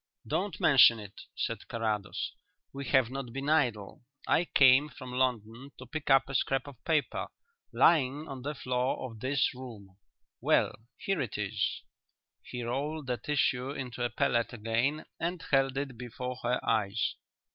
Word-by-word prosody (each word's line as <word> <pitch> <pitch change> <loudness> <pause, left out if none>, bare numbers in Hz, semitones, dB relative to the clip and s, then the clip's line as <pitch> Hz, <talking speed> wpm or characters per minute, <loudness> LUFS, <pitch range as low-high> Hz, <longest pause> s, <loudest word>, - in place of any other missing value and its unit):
"Don't 195 -3 -2
mention 125 -5 +7
it," 105 -1 -10 0.2
said - - -3
Carrados. 105 -3 -2 0.4
"We 140 0 -5
have 130 -3 +3
not 135 -3 -5
been 135 +3 -3
idle. 120 -10 +1 0.2
I 175 - +3
came 135 0 +5
from 130 -1 -10
London 125 +1 -1
to 130 - -10
pick 145 +4 -5
up 135 -1 +5
a 135 - -6
scrap 135 +1 +1
of 140 -5 -12
paper, 155 -3 0 0.4
lying 150 -1 +3
on 135 -2 -7
the 145 +3 -4
floor 125 0 -1
of 110 - -12
this 130 +2 +1
room. 110 -7 -11 0.4
Well, - - +3 0.2
here 195 -5 -1
it 120 -6 -3
is." 105 0 -2 0.6
He 125 -1 -6
rolled 145 +5 -3
the 125 -1 -1
tissue 135 -2 0
into 125 -3 -5
a 120 - +1
pellet 120 0 0
again 120 +7 -1
and 170 +2 -2
held 135 -1 +3
it 135 -2 -3
before 125 +1 -5
her 120 +1 +1
eyes. 105 -3 +1
130 Hz, 155 wpm, -30 LUFS, 120-140 Hz, 0.6 s, mention